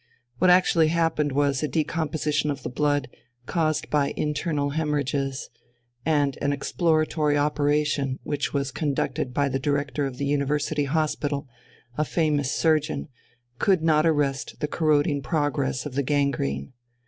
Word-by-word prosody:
What 185 - +4
actually 180 -3 +5
happened 160 -2 +1
was 140 0 +1
a 155 - 0
decomposition 155 -1 -1
of 140 -2 -4
the - - -4
blood, 145 +1 +1 0.4
caused 155 0 0
by 145 -2 +1
internal 150 -1 -1
hæmorrhages; 140 -3 -1 0.6
and 145 -2 +1
an 145 - +1
exploratory 155 0 +1
operation, 145 -2 +1
which 145 0 -2
was 140 -1 -1
conducted 140 -3 -1
by 140 +2 +1
the 135 0 -1
Director 145 0 -1
of 130 -2 -8
the 140 - -2
University 145 +1 0
Hospital, 145 -1 -1 0.5
a - - +4
famous 150 -4 0
surgeon, 155 -2 +1 0.5
could 190 -5 +3
not 155 0 +4
arrest 145 -3 0
the 150 - -1
corroding 150 -2 +1
progress 140 -2 -1
of 145 - -5
the 140 - +1
gangrene. 130 - -1
145 Hz, 135 wpm, -25 LUFS, 140-155 Hz, 0.6 s, actually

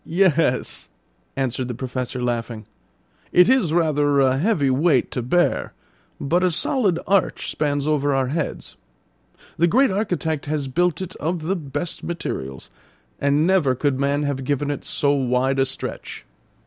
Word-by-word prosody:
"Yes," 165 -7 +1 0.5
answered 130 -2 -2
the 125 - -4
Professor 125 0 -4
laughing. 115 -2 -3 0.7
"It 180 - +6
is 250 -10 +3
rather 150 -4 +2
a 135 -1 +3
heavy 155 -7 +2
weight 140 -1 +2
to 125 - -2
bear, 175 +9 +1 0.5
but 175 +6 +1
a 185 - +4
solid 195 - +1
arch 195 -1 +1
spans 145 -2 -1
over 145 -2 +1
our 135 -2 +1
heads. 155 +2 -4 0.8
The 170 - +5
great 255 +7 +3
Architect 175 -7 -2
has 145 -2 -2
built 175 +6 0
it 185 0 -8
of 165 +1 -2
the 185 +5 0
best 165 +1 -5
materials; 65 - -5 0.5
and 140 +2 +2
never 170 -8 +3
could 135 0 0
man 140 +1 +1
have 140 -2 -2
given 145 +2 -1
it 145 - -5
so 140 - +1
wide 130 0 +1
a 135 - +3
stretch. - - -5
145 Hz, 150 wpm, -22 LUFS, 130-175 Hz, 0.8 s, It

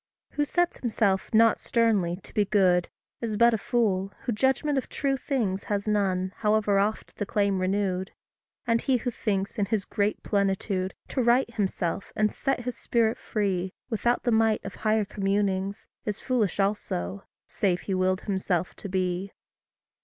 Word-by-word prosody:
Who 290 - 0
sets 350 +4 +1
himself 210 -5 0
not 225 0 +5
sternly 210 -7 +2
to - - -11
be 210 - +3
good, 185 -4 +3 0.3
Is 220 -3 -2
but 235 +1 +6
a - - +2
fool, 195 -5 0
who - - -1
judgment 265 +5 +1
of - - -8
true 275 -1 0
things 235 -9 -1
Has 205 0 -2
none, 190 -3 +1
however 210 -2 +2
oft 210 +2 -2
the 205 - -2
claim 200 -2 +1
renewed. 190 0 0 0.6
And 230 -1 +2
he 265 -2 +2
who 245 +1 -3
thinks, 200 -1 -2
in 200 - +1
his 215 -2 0
great 205 +1 -1
plenitude, 195 -1 0
To 260 - 0
right 240 0 +3
himself, 195 -4 -2
and 215 0 +2
set 270 -2 -1
his 250 0 -4
spirit 230 -1 +1
free, 190 -3 -1 0.2
Without 240 +2 +1
the 240 - +1
might 220 -1 +2
of 195 - -5
higher 215 -1 +2
communings, 195 0 -1 0.2
Is 210 -1 -3
foolish 230 -7 0
also 100 - -1 0.2
save 180 -3 0
he 195 - -3
willed 185 0 +1
himself 185 -3 -1
to 200 - -6
be. 185 +1 -1
205 Hz, 165 wpm, -27 LUFS, 190-230 Hz, 0.6 s, but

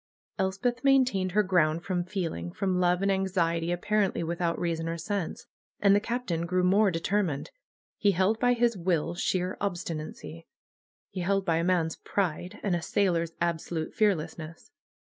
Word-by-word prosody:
Elspeth 200 +6 -1
maintained 255 -10 +3
her 210 +1 +4
ground 170 -4 +2
from 180 -2 -1
feeling, 170 - -4
from 185 - -1
love, 180 +1 +2
and 200 - +3
anxiety, 175 -3 0
apparently 195 +1 0
without 170 0 -1
reason 165 -1 -2
or 165 - -3
sense. 195 +1 -3 0.3
And 200 -1 +5
the - - +5
Captain 205 -7 -2
grew 180 +1 +1
more 200 +3 +4
determined. 170 -3 -1 0.5
He 205 -1 +3
held 190 +5 +2
by 245 0 +4
his 240 -1 +2
will, 170 -3 0
sheer 180 +1 -1
obstinacy. 165 -4 -5 0.6
He 190 - -5
held 195 +2 +1
by 165 -1 +2
a 165 - 0
man's 170 -3 +1
pride, 185 +1 -2
and 195 -4 +1
a 170 - -2
sailor's 170 -3 0
absolute 170 -1 -2
fearlessness. 165 -5 -1
180 Hz, 155 wpm, -28 LUFS, 165-200 Hz, 0.6 s, And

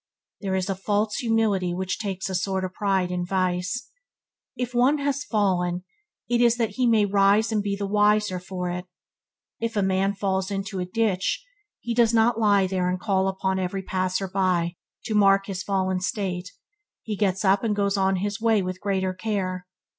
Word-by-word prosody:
There 190 -2 -2
is 190 0 -1
a 195 - 0
false 205 +3 -1
humility 215 -6 +1
which 185 0 -3
takes 195 -3 -3
a 190 - -4
sort 190 +1 -1
of 185 - -6
pride 190 -2 0
in 180 0 -1
vice. 185 +5 -1 0.6
If 250 0 -3
one 255 +5 +4
has 285 0 -1
fallen, 180 -6 0 0.4
it 240 0 +2
is 240 0 +4
that 225 -3 0
he 250 +4 +1
may 220 -3 +4
rise 200 +3 +3
and 215 -1 +1
be 200 -1 -1
the 200 0 -3
wiser 210 -1 +2
for 180 0 -4
it. 180 +1 -4 0.7
if 230 0 -3
a 205 - +3
man 190 +1 +1
falls 190 -1 -1
into 195 -1 -3
a 180 - -1
ditch, 200 - 0 0.4
he 235 - -2
does 230 -1 +3
not 225 +1 +3
lie 205 -3 +4
there 185 -1 0
and 180 0 -1
call 190 -1 +1
upon 190 0 -1
every 190 +1 -2
passer 185 +1 -1
by 180 -2 0 0.3
to 220 - -2
mark 195 -1 +4
his 190 -2 -4
fallen 190 -1 0
state, 185 -2 -3 0.5
he 215 - -3
gets 195 -1 0
up 195 +1 +3
and 215 -2 +1
goes 200 0 +1
on 190 -1 +2
his 200 +3 -3
way 225 -3 +3
with 185 0 -5
greater 190 -2 0
care. 185 -3 -3
195 Hz, 190 wpm, -25 LUFS, 185-210 Hz, 0.7 s, one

